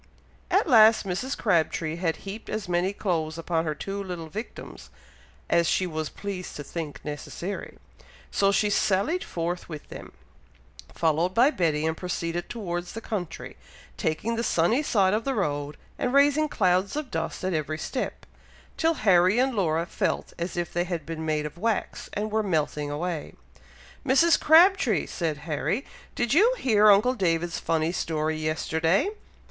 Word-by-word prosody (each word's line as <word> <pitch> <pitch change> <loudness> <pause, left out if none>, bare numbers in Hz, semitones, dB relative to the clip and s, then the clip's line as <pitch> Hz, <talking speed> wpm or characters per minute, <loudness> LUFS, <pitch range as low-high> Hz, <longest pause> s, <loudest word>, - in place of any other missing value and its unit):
At - - +2
last 220 -5 +6
Mrs. 195 +9 -3
Crabtree 165 -4 0
had 170 -2 0
heaped 205 +3 -7
as 215 -3 -3
many 175 +2 +1
clothes 165 -6 -2
upon 165 0 -1
her 155 -1 -2
two 195 +6 -4
little 175 -4 -6
victims, 215 +9 -8 0.6
as 170 -1 +3
she 185 - +2
was 155 -3 -3
pleased 195 -3 -6
to 145 - -6
think 155 0 -6
necessary; 170 +6 -6 0.5
so 195 0 +3
she 205 +1 +2
sallied 205 - +1
forth 175 +1 -4
with 155 -3 -8
them, - - -9 0.8
followed 165 +3 +1
by 255 +5 +5
Betty, 160 - 0
and 160 0 0
proceeded 175 -1 -3
towards 175 -6 -4
the 225 - -5
country, 195 -7 -5 0.4
taking 185 +9 -1
the 230 - 0
sunny 215 - +2
side 200 -9 +2
of 220 +2 0
the 270 +1 -1
road, 145 -6 -2 0.2
and 250 +2 0
raising 290 +2 +4
clouds 185 -1 +1
of 300 -4 -4
dust 165 +2 -3
at 185 0 0
every 155 0 -2
step, 250 - -4 0.5
till 325 0 +2
Harry 185 +1 +5
and 260 +1 +2
Laura 170 -6 +1
felt - - -2
as 170 +1 -4
if 175 -1 -2
they 175 +1 0
had 170 -4 -4
been 160 -1 -5
made 155 -1 0
of 150 +3 -7
wax, 225 +2 -2
and 210 +1 -2
were 220 +1 +2
melting 150 -6 -1
away. 160 +2 -4 0.7
"Mrs. 285 +5 +4
Crabtree!" 320 - +5
said 160 -3 -3
Harry, 170 - -1 0.3
"did 240 0 0
you 445 +10 +5
hear 215 - +4
uncle 210 +5 +5
David's 170 -6 0
funny 165 0 0
story 155 -3 -1
yesterday? 160 - +1
180 Hz, 160 wpm, -26 LUFS, 160-220 Hz, 0.8 s, last